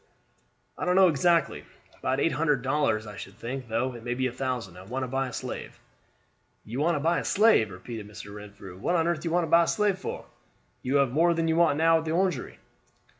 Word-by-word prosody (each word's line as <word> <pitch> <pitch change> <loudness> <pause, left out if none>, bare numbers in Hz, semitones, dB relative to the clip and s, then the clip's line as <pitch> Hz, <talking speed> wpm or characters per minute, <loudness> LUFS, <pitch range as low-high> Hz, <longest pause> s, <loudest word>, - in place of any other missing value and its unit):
"I - - -3
don't 180 0 +2
know 190 -1 +7
exactly. 165 +1 +2 0.4
About 130 +1 -1
eight 165 - +2
hundred 145 -3 +1
dollars, 130 -6 +1
I 105 -1 -9
should 95 - -9
think; 125 +1 -5
though 120 +3 -1
it 120 -1 -10
may 120 0 -2
be 130 +1 -1
a 130 - 0
thousand. 125 -7 -4
I - - -10
want 125 +7 -4
to - - -3
buy 135 +1 -1
a - - -7
slave." - - -6 0.9
"You 120 +5 -5
want 165 +3 +2
to - - -1
buy 165 +4 +1
a - - -4
slave!" 210 - +4
repeated 105 +3 -8
Mr. 100 -1 -10
Renfrew. 100 -3 -11
"What 175 - 0
on 165 -1 +2
earth 170 -2 0
do 170 - -5
you - - -1
want 175 +1 +2
to 160 - -8
buy 170 0 +6
a - - -7
slave 205 -3 +1
for? - - -6 0.6
You 130 +2 -1
have 140 -3 +3
more 170 +5 +3
than 165 0 0
you 160 - +2
want 165 -4 +3
now 165 +1 +4
at 160 - -7
the 160 - -1
Orangery." 180 -7 -1
135 Hz, 240 wpm, -27 LUFS, 120-165 Hz, 0.9 s, know